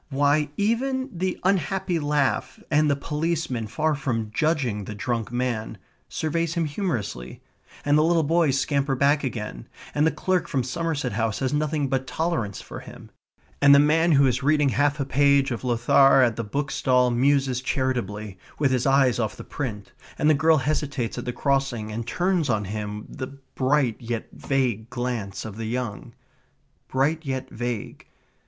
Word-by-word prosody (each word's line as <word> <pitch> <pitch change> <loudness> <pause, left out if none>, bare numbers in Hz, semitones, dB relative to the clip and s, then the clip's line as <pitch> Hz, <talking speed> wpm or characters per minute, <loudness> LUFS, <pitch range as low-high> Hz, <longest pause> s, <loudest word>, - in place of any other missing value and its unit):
Why, 145 +1 +2
even 260 +5 0
the 185 +1 -2
unhappy 185 -1 +1
laugh, 145 -3 0
and 150 0 +4
the 140 - +3
policeman, 150 -5 -2
far 155 +7 0
from 115 -6 -2
judging 130 -11 0
the 105 - -6
drunk 115 +1 -2
man, 120 -3 -2 0.3
surveys 165 +1 -1
him 170 -1 +1
humorously, 120 - -4 0.4
and 145 +1 +4
the - - +4
little 165 0 +3
boys 155 -3 +2
scamper 140 -1 0
back 145 +3 +2
again, 105 - -5 0.3
and 150 +2 +3
the - - +2
clerk 175 +2 0
from 130 -3 0
Somerset 145 -1 -2
House 110 0 -1
has 135 +1 -1
nothing 150 -1 0
but 130 0 -1
tolerance 160 - -2
for - - -8
him, - - -12 0.5
and 140 0 +8
the - - +7
man 160 +3 +4
who 140 -1 +5
is 125 0 +1
reading 150 0 +3
half 145 +3 +1
a 140 - 0
page 140 0 +3
of 120 - -4
Lothair 130 +2 +5
at 115 -3 +2
the 115 - -3
bookstall 125 +1 +1
muses 130 0 +2
charitably, 110 -7 -2 0.2
with 140 -3 +2
his 130 +1 +1
eyes 135 -3 +3
off 110 -3 -2
the - - -8
print, 110 -8 -5 0.3
and 150 - +1
the 155 - +6
girl 160 +2 +4
hesitates 135 -4 -2
at 120 - -6
the 125 - -1
crossing 130 -4 -1
and 115 +2 -5
turns 175 -1 0
on 105 -3 +1
him 105 +1 -5
the 130 +1 -7 0.2
bright 130 -4 +1
yet 115 -2 -4
vague 120 -5 -1
glance 120 -6 -4
of 110 -1 -7
the 115 -1 -4
young. 120 -3 -4 0.7
Bright 150 +5 0
yet 130 -2 -4
vague. 120 -2 -5
135 Hz, 170 wpm, -24 LUFS, 120-150 Hz, 0.7 s, and